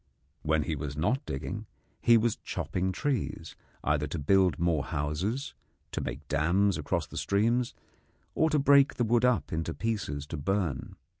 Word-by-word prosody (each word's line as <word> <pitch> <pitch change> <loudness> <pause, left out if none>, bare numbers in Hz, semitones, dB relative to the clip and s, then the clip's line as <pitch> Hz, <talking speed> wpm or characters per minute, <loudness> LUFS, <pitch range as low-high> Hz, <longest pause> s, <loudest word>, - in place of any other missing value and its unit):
When 80 0 +1
he 80 - -2
was 75 0 -5
not 125 - +1
digging, 65 - -4 0.3
he 115 -1 +6
was 115 0 +1
chopping 95 +1 -2
trees, 135 +3 -2 0.3
either 75 0 +1
to 80 - -4
build 90 +4 +3
more 85 -4 +1
houses, 80 - -2 0.4
to - - -2
make 70 +3 -5
dams 90 +8 +2
across - - -1
the - - -10
streams, 115 +5 +1 0.6
or 160 - +3
to 155 - +2
break 140 0 +5
the 120 - +1
wood 120 +2 +3
up 125 -9 +1
into 80 +1 -2
pieces 100 -11 -2
to 80 - -6
burn. 90 -3 -1
95 Hz, 160 wpm, -29 LUFS, 75-115 Hz, 0.6 s, he